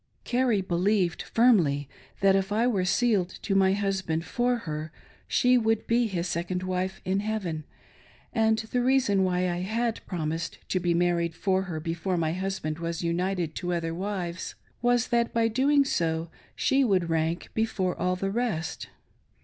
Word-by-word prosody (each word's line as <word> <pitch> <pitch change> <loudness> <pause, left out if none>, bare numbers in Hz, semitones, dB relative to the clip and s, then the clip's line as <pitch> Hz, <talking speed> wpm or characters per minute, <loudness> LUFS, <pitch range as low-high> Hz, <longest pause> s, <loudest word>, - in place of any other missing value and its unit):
Carrie 245 -4 +1
believed 185 0 +1
firmly, 170 - +3 0.3
that 195 0 +5
if 195 +1 0
I 220 +3 +2
were 200 -7 +1
sealed 200 -3 +2
to 200 - 0
my 190 -1 +4
husband 190 -5 -1
for 245 0 +1
her, 155 0 -4 0.4
she 250 0 +4
would 225 -1 +1
be 235 0 +2
his 180 -3 -2
second 175 +2 -2
wife 185 +1 -2
in 190 +1 +1
heaven; 195 -8 -3 0.7
and 220 -1 +3
the 225 +3 -1
reason 245 -7 +3
why 180 0 +1
I 175 -1 -1
had 225 +4 -1
promised 165 -2 -3
to 185 - +1
be 175 -1 +1
married 170 -1 +1
for 190 0 +1
her 160 -2 -3
before 170 +3 -2
my 160 -1 0
husband 185 -4 -3
was 170 0 -3
united 175 -1 -1
to 180 -1 -2
other 165 -1 -2
wives 180 -2 -4 0.3
was, 245 0 +2
that 235 -1 +1
by 230 -1 +3
so 225 - -5
doing, 280 +3 +4 0.7
she 270 0 +2
would 185 -8 +1
rank 165 +1 -1
before 220 -5 0
all 180 0 0
the 195 +2 -2
rest. 210 -8 -2
190 Hz, 165 wpm, -27 LUFS, 170-220 Hz, 0.7 s, that